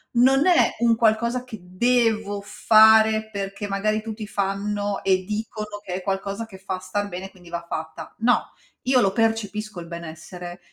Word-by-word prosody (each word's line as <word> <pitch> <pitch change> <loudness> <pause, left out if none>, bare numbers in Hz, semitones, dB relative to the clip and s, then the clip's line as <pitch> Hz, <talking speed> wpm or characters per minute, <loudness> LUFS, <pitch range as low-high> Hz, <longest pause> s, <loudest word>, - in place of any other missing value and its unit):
non 265 +6 +5
è 360 - +5
un 235 -1 +4
qualcosa 235 +2 +1
che 240 -4 -9
devo 215 +1 +1
fare, 220 +1 +5
perché 200 0 -4
magari 215 +2 0
tutti 220 -1 -6
fanno 205 0 -2
e 185 -1 +2
dicono 210 0 -5
che 180 - -5
è 185 - -4
qualcosa 200 +3 -3
che 195 -4 -12
fa 190 -1 -5
star 205 +2 -3
bene, 190 0 -7
quindi 175 -3 -17
va 170 0 -4
fatta. 160 0 -6
No, 240 +2 +2 0.3
io 255 0 +3
lo 195 -5 +3
percepisco 215 -2 -1
il 170 - -7
benessere, 170 +2 -8
205 Hz, 160 wpm, -23 LUFS, 190-220 Hz, 0.3 s, non